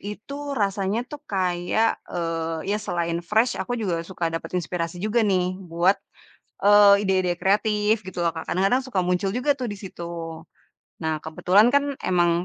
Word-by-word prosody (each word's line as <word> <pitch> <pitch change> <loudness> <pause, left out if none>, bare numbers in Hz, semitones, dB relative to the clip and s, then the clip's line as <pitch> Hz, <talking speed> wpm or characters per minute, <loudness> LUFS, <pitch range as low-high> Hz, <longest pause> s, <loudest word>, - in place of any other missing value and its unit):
Itu 280 +8 -6
rasanya 200 +2 0
tuh 295 - -7
kayak, 185 +3 +1
eee, 165 +1 -2
ya, 210 - 0
selain 170 -4 -2
fresh 220 +6 +2
aku 245 - -3
juga 180 -6 -1
suka 170 -2 -3
dapat 165 - -5
inspirasi 170 0 -3
juga 215 +4 +1
nih 185 -2 +1
buat 175 +2 +2 0.7
e 205 - +5 0.4
ide-ide 185 -2 +2
kreatif 210 +2 +2
gitu 185 -1 -5
loh 170 - +2
Kak. 160 - -7
Kadang-kadang 195 +8 +2
suka 200 -8 0
muncul 180 +2 0
juga 255 +6 +2
tuh 250 -3 -3
di - - -7
situ. 185 -3 -8 1.0
Nah, 160 -1 0
kebetulan 185 +7 +3
kan 285 - +4 0.2
emang, 175 -2 +3
190 Hz, 160 wpm, -24 LUFS, 175-210 Hz, 1.0 s, e